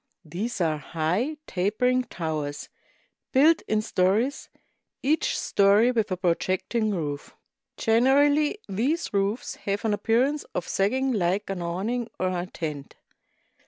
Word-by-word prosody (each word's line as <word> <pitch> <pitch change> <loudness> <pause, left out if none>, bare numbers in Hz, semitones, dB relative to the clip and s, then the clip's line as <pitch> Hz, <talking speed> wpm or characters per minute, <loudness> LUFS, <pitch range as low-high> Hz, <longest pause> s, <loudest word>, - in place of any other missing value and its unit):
These 195 +9 -4
are 155 -3 +1
high, 180 - -1
tapering 250 +7 +1
towers, 155 -6 -4 0.6
built 310 +5 +5
in 215 0 +1
stories, 215 +8 0 0.5
each 300 +4 +1
story 205 +4 +4
with 220 -5 0
a 185 - 0
projecting 185 +5 0
roof. 150 -7 -4 0.4
Generally 285 - +3
these 255 - -1
roofs 200 +4 -1
have 200 +2 -3
an 215 - +2
appearance 250 +8 +1
of 175 - -2
sagging 260 +7 +1
like 195 -1 0
an 185 -2 -4
awning 205 +8 -2
or 185 - +1
a 180 0 -3
tent. 150 -5 -6
205 Hz, 125 wpm, -26 LUFS, 180-250 Hz, 0.6 s, built